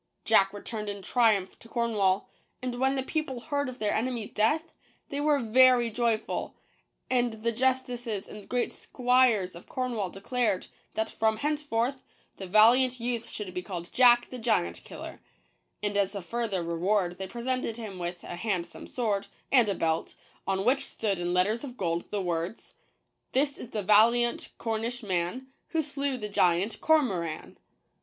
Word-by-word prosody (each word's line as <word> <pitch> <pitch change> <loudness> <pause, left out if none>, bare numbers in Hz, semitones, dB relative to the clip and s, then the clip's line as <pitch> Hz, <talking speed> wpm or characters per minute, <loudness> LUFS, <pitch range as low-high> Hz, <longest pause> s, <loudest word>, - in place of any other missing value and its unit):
Jack 195 -3 +5
returned 210 +1 -5
in 200 -1 -6
triumph 215 -5 +2
to 230 - -15
Cornwall; 210 -5 +1 0.3
and 250 -1 -4
when 265 +1 +2
the 265 - -1
peo 310 +3 0
ple 260 -5 -6
heard 285 +2 -2
of 255 - -8
their 210 -4 0
enemy's 235 -2 -2
death, 300 +10 +1 0.4
they 285 +1 -3
were 295 -1 +3
very 245 0 +5
joyful; 230 -1 -1 0.5
and 240 -4 0
the 235 - +2
justices 245 -3 -1
and 210 -1 -10
great 245 -1 0
squires 245 -7 +2
of 170 - -13
Cornwall 240 -7 -2
declared, 205 +1 -1 0.3
that 220 0 -1
from 220 0 +1
henceforth, 275 -2 -1 0.3
the 190 - -7
valiant 245 +6 +5
youth 235 -1 -3
should 200 -4 -6
be 180 - -3
called 175 -2 -7
Jack 240 -1 +5
the 255 - -6
Giant 85 - 0
Killer; - - -9 0.6
and 205 -1 -1
as 200 0 +1
a 200 - -3
further 220 -3 -2
reward 175 +2 0
they 190 - -4
presented 240 +1 -2
him 210 -5 -7
with 175 0 -4
a 175 - -6
handsome 175 -4 -3
sword, 205 -5 -1 0.2
and 245 -6 +5
a 200 - 0
belt, 160 0 -1 0.3
on 195 0 0
which 265 +3 +2
stood 200 -5 -2
in 175 0 -1
letters 200 +7 +1
of 255 -3 -8
gold 170 -2 -2
the 205 -2 -2
words: 170 +3 -3 0.6
This 280 +2 +2
is 240 - -9
the 210 -4 -3
valiant 235 +4 +4
Cornish 230 +2 -3
Man 190 +7 -2 0.2
Who 320 -1 0
slew 280 -2 -2
the 210 -3 -4
Giant 185 +1 +1
Cormoran 195 - +1
225 Hz, 165 wpm, -28 LUFS, 195-250 Hz, 0.6 s, Jack